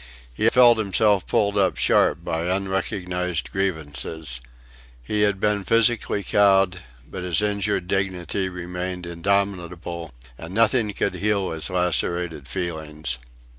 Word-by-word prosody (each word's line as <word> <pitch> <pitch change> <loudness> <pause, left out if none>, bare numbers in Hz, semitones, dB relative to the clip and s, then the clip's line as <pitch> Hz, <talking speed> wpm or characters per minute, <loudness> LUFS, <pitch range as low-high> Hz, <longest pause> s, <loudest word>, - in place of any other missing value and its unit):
He 110 - +3
felt 120 -2 +6
himself 100 -1 +2
pulled 105 -3 +1
up 95 -2 +2
sharp 85 - +3
by 80 0 -2
unrecognised 90 -2 -2
grievances. 80 -7 -2 0.6
He 105 +12 -1
had 100 -2 +2
been 105 -1 +1
physically 115 -1 +2
cowed, 95 -2 +3 0.3
but 95 - -7
his 90 -1 0
injured 100 -3 0
dignity 95 -1 -1
remained 90 0 -5
indomitable, 85 -2 -2 0.3
and 85 +4 -8
nothing 115 -1 +3
could - - -1
heal 100 +1 0
his 80 -2 -2
lacerated 90 -4 -1
feelings. 75 -7 -3
95 Hz, 120 wpm, -23 LUFS, 85-100 Hz, 0.6 s, felt